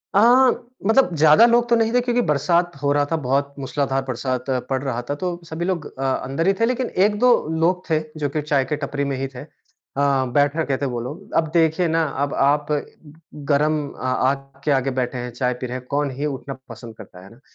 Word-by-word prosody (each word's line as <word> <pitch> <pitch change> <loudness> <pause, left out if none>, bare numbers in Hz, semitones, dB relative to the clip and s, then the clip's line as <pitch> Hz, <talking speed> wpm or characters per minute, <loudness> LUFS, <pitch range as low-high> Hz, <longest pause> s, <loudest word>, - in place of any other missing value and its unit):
अ, - - +6 0.7
मतलब 225 -5 +4
ज़्यादा 155 +8 +6
लोग 240 0 +3
तो 235 - +5
नहीं 225 -1 +2
थे 245 - +4
क्योंकि 245 0 +1
बरसात 170 +4 +2
हो 140 -1 +1
रहा 145 0 +2
था - - +2
बहुत 140 +2 0
मूसलाधार 135 0 -1
बरसात 130 0 -3 0.2
पड़ 130 -1 0
रहा 125 -3 -2
था। 145 - 0
तो 175 +2 -4
सभी 160 +2 -3
लोग 180 -4 -2
अ, - - -2
अंदर 135 +4 -1
ही 195 - +5
थे 230 - +4
लेकिन 250 +1 -1 0.2
1-2 210 +4 +2 0.3
लोग 180 +2 +1
थे 155 -1 +3 0.2
जो 145 -1 -1
कि 150 +2 -2
चाय 145 -2 +1
के 150 - -2
टपरी 140 0 -3
में - - -1
ही 135 +1 -2
थे। 125 - -7
अ, - - -13 0.5
बैठा 140 +2 +2
कहते 140 -1 -1
हैं 130 - -2
वो 120 - -3
लोग, 150 +11 -8
अब 165 - +2
देखिए 165 +1 +3
ना 165 0 +1 0.2
अब 145 - -2
आप 145 +2 +1
अ, 145 -1 +1 0.7
गरम 150 +2 +3
अ, - - -13
आग 135 +1 -1
के 150 - +2
आगे 135 -1 +1
बैठे 125 0 -2
हैं, 125 0 -5
चाय 125 +1 -1
पी - - -2
रहे 125 +1 -4
हैं, 125 - -11
कौन 145 0 -1
ही 145 - -1
उठना 140 -1 -4 0.2
पसंद 115 -1 -10
करता 90 0 -13
है 95 - -13
ना, 115 - -18
145 Hz, 230 wpm, -21 LUFS, 135-165 Hz, 0.7 s, अ